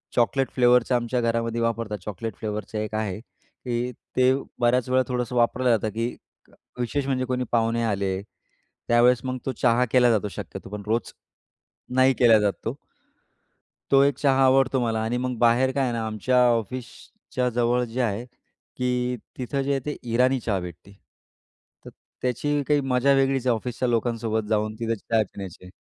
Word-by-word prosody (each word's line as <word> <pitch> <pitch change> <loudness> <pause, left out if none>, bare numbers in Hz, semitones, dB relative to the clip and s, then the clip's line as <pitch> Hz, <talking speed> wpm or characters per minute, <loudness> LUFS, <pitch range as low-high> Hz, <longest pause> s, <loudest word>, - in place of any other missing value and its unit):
Chocolate 130 +3 +2
फ्लेवरचं 125 0 +4
आमच्या 120 +1 0
घरामध्ये 115 0 -1
वापरतात. 115 -2 -1
चॉकलेट 105 +1 -5
फ्लेवरचं 105 0 -5
एक 110 0 -3
आहे 105 -3 -2
की, 125 0 -6 0.2
ते 130 0 +4 0.3
बऱ्याच 120 +1 +2
वेळा 130 0 +3
थोडंसं 125 -1 -2
वापरलं 125 +1 +2
जातं 110 - -3
की, 115 +3 -3 0.7
विशेष 135 +3 -1
म्हणजे 130 -2 0
कोणी 125 0 -1
पाहुणे 115 0 +1
आले 100 -3 -1
त्यावेळेस, 120 +3 0
मग 130 0 -3
तो 135 - 0
चहा 120 0 +4
केला 125 -1 +5
जातो 105 -2 +1
शक्यतो. 95 - -8
पण 105 0 -6
रोज 115 +2 -1 0.8
नाही 130 +1 +5
केला 115 -3 +6
जात 100 -1 +2
तो. 115 +5 -3 1.2
तो 135 0 +6
एक 140 -2 +2
चहा 135 -2 +3
आवडतो 130 0 +3
मला, 115 -2 0
आणि 115 +2 -1
मग 125 -1 -2
बाहेर 120 +2 +4
काय 135 +1 0
आहे 125 - 0
ना, 115 -1 -2
आमच्या 110 +4 0
ऑफिसच्या 125 +2 -4
जवळ 120 +1 +1
जे 120 +2 -3
आहे 115 0 -1 0.5
की, 125 0 -1 0.2
तिथं 135 +2 -2
जे 140 +1 -1
आहे, 135 - +1
ते 150 - -3 0.2
इराणी 130 +2 +3
चहा 105 -5 -1
भेटते. 90 +2 -10 0.9
तर - - -8 0.3
त्याची 145 +4 0
काही 145 -1 +3
मज्जा 135 +1 +2
वेगळीच 135 -1 +1
आहे, 120 - +4
ऑफिसच्या 125 +2 -3
लोकांसोबत 115 -2 -1
जाऊन 110 0 0
तिथे 115 -1 -1
चाय 110 +1 0
पिण्याची. 95 -2 -10
120 Hz, 165 wpm, -25 LUFS, 110-130 Hz, 1.2 s, केला